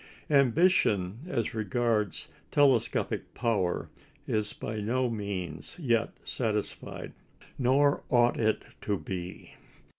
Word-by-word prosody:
Ambition 125 - +3
as 120 -10 -1
regards 110 -1 0 0.2
telescopic 135 -5 +2
power 105 -7 0 0.4
is 105 -1 0
by 110 -1 -5
no 125 +4 +1
means 90 -8 -4
yet 120 -8 +1 0.2
satisfied. 105 -4 -3 0.5
Nor 140 +3 +3
ought 120 -2 +4
it 110 -1 +1 0.2
to 100 -1 0
be. 90 +2 -6
110 Hz, 95 wpm, -29 LUFS, 100-125 Hz, 0.5 s, ought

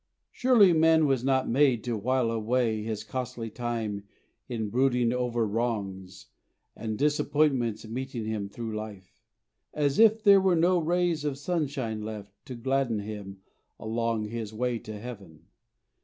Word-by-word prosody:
Surely 230 -8 +5
man 160 0 +4
was 135 -4 +1
not 130 -1 +2
made 130 -3 +3
to 120 -2 -2
while 125 +2 0
away 115 0 0
His 110 -1 -4
costly 125 -3 -5
time 110 -4 -3 0.4
in 110 -4 -3
brooding 125 -1 +2
over 120 -2 0
wrongs 100 -4 -3 0.5
And 110 -1 -4
disappointments 145 -5 +1
meeting 125 0 -4
him 105 -2 -3
through 115 +1 -5
life, 105 -3 -8 0.5
As 145 -2 +1
if 220 0 +5
there 200 -2 +7
were 190 -2 +3
no 175 +2 +3
rays 170 -1 0
of 145 -2 -2
sunshine 140 -8 -2
left 105 -1 -7 0.2
To 130 - -6
gladden 130 -1 0
him 100 -2 -8 0.4
along 115 0 -1
his 115 -2 -5
way 120 +1 -1
to 110 -1 -8
Heaven. 100 -9 -10
120 Hz, 140 wpm, -28 LUFS, 110-140 Hz, 0.5 s, there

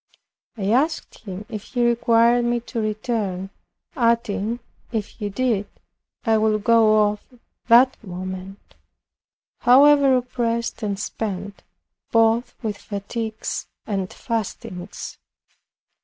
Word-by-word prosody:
I 200 -1 0
asked 305 +7 0
him 195 +1 -6
if 215 -3 -6
he 245 -2 -1
required 235 0 +4
me 240 0 +1
to 230 0 -4
return, 210 -3 -2 0.4
adding, 230 -3 +1 0.3
if 220 -4 -1
he 210 -2 -5
did, 210 -2 0 0.6
"I 225 -2 +3
would 215 -1 +1
go 220 -2 +5
off 205 0 -4 0.4
that 245 +1 +5
moment 185 +1 -7 0.9
however 275 +1 +6
oppressed 235 -2 -2
and 200 -2 -2
spent, 200 -2 -4 0.5
both 225 +1 +3
with 210 -2 -3
fatigues 220 +2 -4 0.2
and 195 -3 -2
fastings." 200 -5 -5
220 Hz, 105 wpm, -23 LUFS, 205-235 Hz, 0.9 s, however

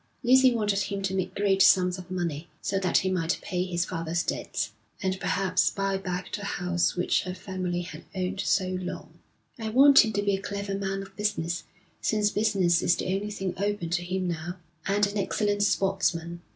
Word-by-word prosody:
Lucy 260 +1 +6
wanted 210 -4 +1
him 200 0 -3
to 190 0 -1
make 190 -1 -2
great 195 -1 +2
sums 180 -1 +5
of 180 - -10
money, 170 -3 -3
so 195 - -1
that 185 -2 +2
he 190 - +1
might 170 -2 0
pay 180 -1 -1
his 175 -1 -1
father's 165 -1 -2
debts, - - -3 0.3
and 190 0 -1
perhaps 185 -2 +2
buy 195 -1 -1
back 185 -1 -4
the 205 - -7
house 180 -3 0
which 180 - +1
her 180 0 -5
family 185 -3 -3
had 160 -2 -9
owned 185 +1 -2
so 185 -2 +1
long. 180 - -7 0.4
'I 220 -1 -3
want 275 +4 +8
him 220 - -1
to 205 0 0
be 200 -1 +2
a 195 - -5
clever 200 0 -4
man 195 0 -2
of 195 - -14
business 180 -5 -1 0.4
since 210 -1 +1
business 195 -5 +2
is 175 - +3
the 185 - -2
only 200 +2 -2
thing 195 -3 -3
open 200 -3 -2
to 175 0 0
him 185 +1 -2
now 175 +1 -4 0.3
and 205 +1 +3
an 200 +1 -3
excellent 205 +1 0
sportsman.' 175 -4 0
190 Hz, 195 wpm, -27 LUFS, 180-200 Hz, 0.4 s, want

